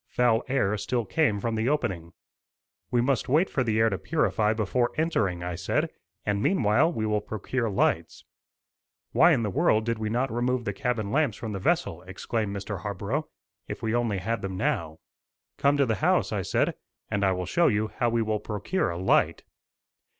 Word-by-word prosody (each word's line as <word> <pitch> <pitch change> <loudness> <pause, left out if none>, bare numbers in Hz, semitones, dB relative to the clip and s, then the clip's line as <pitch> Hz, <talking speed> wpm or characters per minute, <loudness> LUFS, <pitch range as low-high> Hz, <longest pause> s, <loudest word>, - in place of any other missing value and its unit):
Foul 120 -1 +2
air 130 -6 +1
still 120 +2 -1
came 115 -10 +1
from 115 +3 -2
the 110 +3 0
opening. 90 - -2 0.8
"We 120 - +2
must 125 -1 0
wait 160 +8 +3
for 130 - +1
the 110 -2 0
air 110 0 +4
to 95 - -2
purify 110 -9 +1
before 115 +3 0
entering," 100 - 0
I 90 0 -3
said; 95 +2 -1 0.3
"and, 100 -1 0
meanwhile, 135 - +3
we 110 -9 -2
will 105 -1 +1
procure 110 +3 -2
lights." 100 - 0 0.9
"Why 170 +2 +6
in 130 -7 +2
the 105 - -1
world 110 +3 +2
did 115 -1 -1
we 110 -1 -2
not 125 +3 0
remove 120 +1 0
the 100 - -1
cabin 110 -1 -2
lamps 140 -5 +1
from 110 - -5
the 100 - -4
vessel?" 100 - 0
exclaimed 100 +3 -3
Mr. 100 0 -5
Harborough, 105 - -3 0.4
"If - - -7
we 110 0 0
only 120 -4 +1
had 115 +5 -2
them 95 -1 -4
now." 80 -3 -1 0.6
"Come 140 +1 +3
to 140 - +4
the 115 - 0
house," - - +2
I - - -1
said, - - +1 0.4
"and 105 -2 0
I 95 - +4
will 90 0 -3
show 170 - +3
you 110 +1 +1
how 120 +3 0
we 115 0 +1
will 110 -1 -1
procure 105 - -2
a 85 - -4
light." 95 +2 +2
110 Hz, 195 wpm, -27 LUFS, 100-125 Hz, 0.9 s, Why